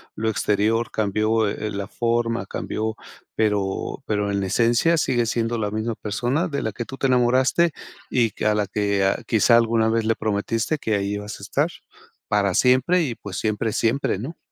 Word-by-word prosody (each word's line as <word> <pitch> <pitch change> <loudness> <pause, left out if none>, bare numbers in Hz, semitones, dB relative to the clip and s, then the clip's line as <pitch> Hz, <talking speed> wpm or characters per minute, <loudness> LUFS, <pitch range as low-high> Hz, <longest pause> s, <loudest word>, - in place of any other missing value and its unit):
lo 110 +1 -1
exterior, 110 +2 +1
cambió, 110 +1 +1
eh, 105 +1 -3
la 100 0 -4
forma, 115 -3 -1
cambió, 110 +1 -3 0.4
pero 105 -3 -1
pero 105 -1 -1
en 100 0 -1
esencia 120 - +2
sigue 120 -5 +1
siendo 115 +1 -1
la 105 -2 -2
misma 110 +1 -2
persona 125 - -1
de 140 - -2
la 110 - -3
que 120 - -4
tú 135 - -9
te 135 - +1
enamoraste 130 +6 +3 0.4
y 115 -3 +2
que - - -5
a 105 - +3
la 105 -1 0
que 100 -1 0
ah 95 - +1
quizá 115 +1 +4
alguna 115 -1 +2
vez 115 0 +1
le 115 0 +2
prometiste 110 +6 -1
que 110 -5 0
ahí 100 0 -1
ibas 105 0 -6
a - - -12
estar - - 0 0.6
para 100 -2 +1
siempre 130 - +3
y 125 -6 -3
pues 100 -4 -7
siempre 110 0 -1
es - - -3
siempre, 115 -4 +1
¿no?, 150 +9 -6
110 Hz, 190 wpm, -23 LUFS, 105-120 Hz, 0.6 s, quizá